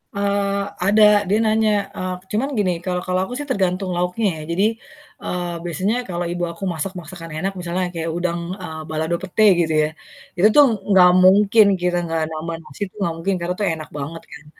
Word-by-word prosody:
Eee, 200 0 0 0.2
ada, 210 +2 +5 0.3
dia 210 - +3
nanya, 220 0 +2 0.3
eee, 185 -1 -3 0.2
cuman 245 +7 0
gini, 190 -3 +2
kalau 180 -1 -1
kalau 185 0 +1
aku 245 - -8
sih 290 - -5
tergantung 185 -2 0
lauknya 180 +5 -1
ya, - - -7
jadi, 190 +4 +1 0.6
eee, 175 -1 -3
biasanya 185 +6 -1
kalau 175 0 -2
ibu 175 0 -3
aku 170 +3 -11
masak 175 +4 -4
masakan 165 -1 -10
enak 195 +4 -2
misalnya 180 +1 -2
kayak 165 0 -3
udang, 175 -1 -1 0.2
eee, 160 -3 -6
balado 160 +2 -1
pete 190 +4 0 0.2
gitu 160 -2 +1
ya, 150 - 0 0.5
itu 185 +4 +6
tuh 290 - +8 0.2
nggak 185 -2 +7
mungkin 205 +3 +6 0.2
kita 180 0 +1
nggak 165 -1 -1
nambah 160 +1 -4
nasi 165 - -15
itu 185 - -14
nggak 170 -3 0
mungkin 195 +4 -1
karena 175 +1 -1
itu 210 - 0
enak 155 -1 -8
banget 155 +4 -6
kan. 155 -3 -12
180 Hz, 195 wpm, -21 LUFS, 170-200 Hz, 0.6 s, tuh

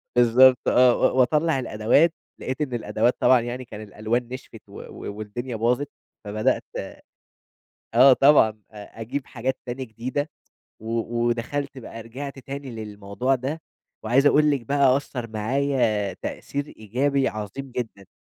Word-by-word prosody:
بالضبط 125 +2 +5
آه، 125 -1 +5
و 130 - +2
وأطلّع 150 +3 +3
الأدوات، 120 +8 +2 0.3
لقيت 130 +3 -4
إن 130 -5 -2
الأدوات 120 +1 +1
طبعًا 130 -1 +5
يعني 120 +2 -5
كان 105 -1 -9
الألوان 110 +3 -2
نشفِت 130 - -9
و - - -10
و - - -8
والدنيا 115 +4 -5
باظت. 125 +6 0 0.3
فبدأت 105 +1 0 1.3
آه 130 +3 +8
طبعًا 140 -4 +6 0.2
أ 105 +2 -11
أجيب 130 +4 -4
حاجات 130 +2 -3
تانية 125 +2 -4
جديدة 130 +6 -4 0.5
و 115 +1 -2 0.3
ودخَلت 130 +4 -2
بقى، 115 -1 -9
رجِعت 135 +5 -7
تاني 135 0 -7
للموضوع 105 +3 -2
ده. 135 +6 -3 0.4
وعايز 130 +6 +3
أقُول 150 +1 +5
لِك 140 -3 +1
بقى 135 +1 +3
أثّر 125 -4 -5
معايا 110 -2 0
تأثير 145 0 -5
إيجابي 130 +5 0
عظيم 110 +6 -6
جدًا. 110 -6 -6
125 Hz, 140 wpm, -24 LUFS, 110-135 Hz, 1.3 s, آه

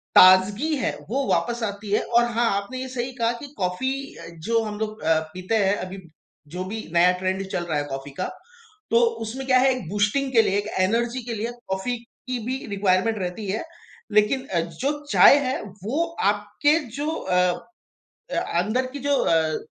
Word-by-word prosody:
ताज़गी 200 +11 +6
है, 255 - 0 0.2
वो 270 +4 0
वापस 240 0 0
आती 205 -1 -4
है। 210 - +3
और 240 0 +3
हाँ 235 0 +2
आपने 255 +6 -7
ये 260 - -4
सही 255 0 -3
कहा 230 0 +3
कि 290 - -8
कॉफ़ी 185 +7 -1 0.6
जो 230 0 +3
हम 210 -1 -5
लोग 215 0 -4
अ, 160 0 +3
पीते 185 +4 -2
हैं, 195 +1 +3
अभी 185 +1 -6 0.5
जो 180 +5 -5
भी 220 +3 -6
नया 175 +1 +6
ट्रेंड 190 +1 -1
चल 175 - -1
रहा 160 -3 -1
है। - - -1
कॉफ़ी 135 +1 -6
का - - -1 0.6
तो 230 - +5 0.2
उसमें 255 +5 -5
क्या 255 -1 +5
है? 265 +1 +4
एक 225 -10 -7
बूस्टिंग 210 +8 +1
के 230 - +7
लिए 195 - +1
एक 205 +1 -2
एनर्जी 235 +6 +1
के 240 - -3
लिए 225 +3 -3 0.2
कॉफ़ी 190 +6 -2
की 245 +1 -7
भी 260 +2 -3
रिक्वायरमेंट 200 +2 +1
रहती 185 +3 -4
है। 215 - -2 0.5
लेकिन 210 +6 +3
अ, 175 - 0
जो 170 - -2 0.2
चाय 280 - +8
है, 255 - -1 0.2
वो 280 +11 0 0.3
आपके 210 +10 +1 0.2
जो 290 +1 -2
अ, 180 - 0 0.9
अंदर 230 +7 0
की 285 - -6
जो 285 +1 +1
अ, 160 -1 +2
215 Hz, 185 wpm, -24 LUFS, 185-250 Hz, 0.9 s, चाय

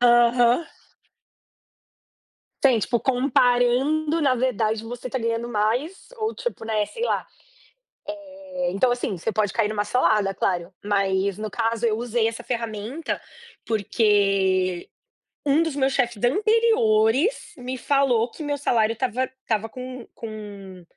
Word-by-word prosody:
Aham. 240 +3 +5 2.0
Sim, 255 -4 +5
tipo, 235 +2 0
comparando, 255 +5 +2
na 280 -4 +3
verdade 230 -3 0
você 245 +2 -6
está 260 +1 -3
ganhando 230 0 -1
mais, 240 - -1
ou, 440 0 -1
tipo, 485 - -5
né, 215 -2 0
sei 465 - -6
lá. - - 0 1.2
Eh, 275 -8 -2
então, 200 +7 +2
assim, 235 -6 -3
você 220 +7 -2
pode 210 -2 0
cair 225 -3 +1
em - - -3
uma 205 -1 -1
cilada 210 -3 +2
claro. 180 -2 -1
Mas 195 -1 +1
no 215 0 -4
caso 230 +2 -1
eu 220 -1 +2
usei 235 -1 0
essa 230 +1 -7
ferramenta, 230 +5 -3 0.5
porque 195 -4 +1 0.6
um 290 +2 +4
dos 325 -4 -1
meus 270 -1 +2
chefes 240 -5 -1
anteriores 340 - +3
me 255 0 -5
falou 260 -4 +2
que - - -11
meu 290 -1 -1
salário 225 -5 +2
estava 255 +1 -1
estava 230 -4 -3
com 255 +1 -8
com 205 -4 -9
235 Hz, 135 wpm, -24 LUFS, 215-260 Hz, 2.0 s, Aham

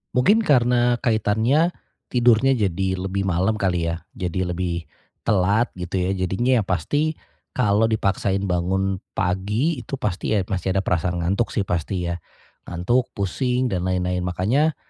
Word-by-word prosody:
Mungkin 205 - +4
karena 120 -4 +3
kaitannya 115 +8 +2 0.4
tidurnya 120 +1 +4
jadi 95 -5 0
lebih 95 +1 -2
malam 95 +3 +1
kali 90 -5 0
ya. 85 0 -3
Jadi 90 0 -2
lebih 90 -1 -2 0.4
telat 105 +4 +2
gitu 90 +2 -4
ya. 90 +1 +1
Jadinya 100 +7 +1
ya - - 0
pasti 145 - 0 0.4
kalau 110 -2 +3
dipaksain 100 -2 0
bangun 95 +1 0 0.2
pagi 105 - 0
itu 130 +3 -5
pasti 105 -2 -1
ya 100 - +2
masih 95 0 -2
ada 95 - +1
perasaan 90 0 0
ngantuk 100 +7 0
sih 105 - +1
pasti 90 0 -2
ya. 85 - -4 0.5
Ngantuk, 120 +9 0
pusing 125 +5 0
dan 90 0 -1
lain-lain. 90 0 0
Makanya 115 - +1
95 Hz, 145 wpm, -22 LUFS, 90-120 Hz, 0.5 s, Mungkin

